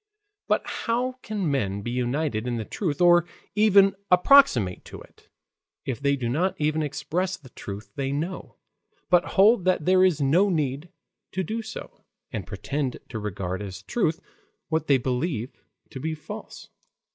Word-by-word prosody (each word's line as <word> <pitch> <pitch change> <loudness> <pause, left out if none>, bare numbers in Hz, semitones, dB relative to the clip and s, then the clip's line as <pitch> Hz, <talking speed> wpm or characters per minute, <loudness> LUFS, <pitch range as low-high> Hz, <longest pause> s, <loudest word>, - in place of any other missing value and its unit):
But - - +1
how 250 +2 -2
can 205 -9 -2
men 100 -7 -1
be 120 - -3
united 125 -1 -1
in 120 -1 -1
the 110 - -4
truth 165 - -3
or 175 -1 +6 0.3
even 200 -2 +5
approximate 180 - +5
to - - -10
it, - - -18 0.6
if 130 -3 -3
they 140 0 +2
do 125 -4 -3
not 165 +10 0
even 155 +1 +1
express 180 +5 -2
the 130 -4 -16
truth 100 -1 -8
they 135 -1 -2
know, 165 +6 -4 0.6
but 180 -1 +6
hold 205 +1 +6
that 185 -5 +2
there 185 0 +5
is 180 -5 +3
no 165 +9 +3
need 150 -1 -1 0.4
to 190 - -1
do 220 +6 -3
so, 220 -1 -9 0.3
and - - -5
pretend 135 -3 -3
to 110 - -5
regard 95 -2 -4
as 95 -2 -7
truth 165 -8 0 0.5
what 160 -1 -1
they 140 - +5
believe 125 0 -3 0.3
to 130 - -7
be 160 +3 -3
false? 210 +8 -9
155 Hz, 160 wpm, -25 LUFS, 125-185 Hz, 0.6 s, or